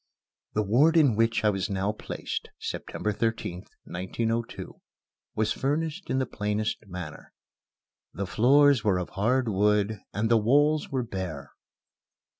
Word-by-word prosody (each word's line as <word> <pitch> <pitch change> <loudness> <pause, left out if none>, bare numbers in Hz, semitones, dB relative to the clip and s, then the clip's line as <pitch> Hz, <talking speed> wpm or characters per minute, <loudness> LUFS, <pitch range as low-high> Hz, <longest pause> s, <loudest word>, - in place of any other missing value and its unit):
The 105 - +1
ward 140 +11 +4
in 140 -8 +5
which 115 0 +2
I 105 - +5
was 95 -1 -2
now 100 +1 0
placed 105 - -5
(September 105 - -3
13th, 105 -5 -2 0.2
1902) 115 +6 -4 0.5
was 110 0 +1
furnished 155 +6 -2
in - - +1
the 130 - +1
plainest 105 -1 -2
manner. 90 -4 -8 0.8
The 100 - -4
floors 135 +5 +4
were 100 -4 +2
of 90 - -3
hard 120 +6 +1
wood 105 +1 +2
and 105 +2 0
the 115 0 +4
walls 145 +7 +3
were 130 -2 -1
bare. 95 -10 -5
110 Hz, 135 wpm, -27 LUFS, 100-130 Hz, 0.8 s, in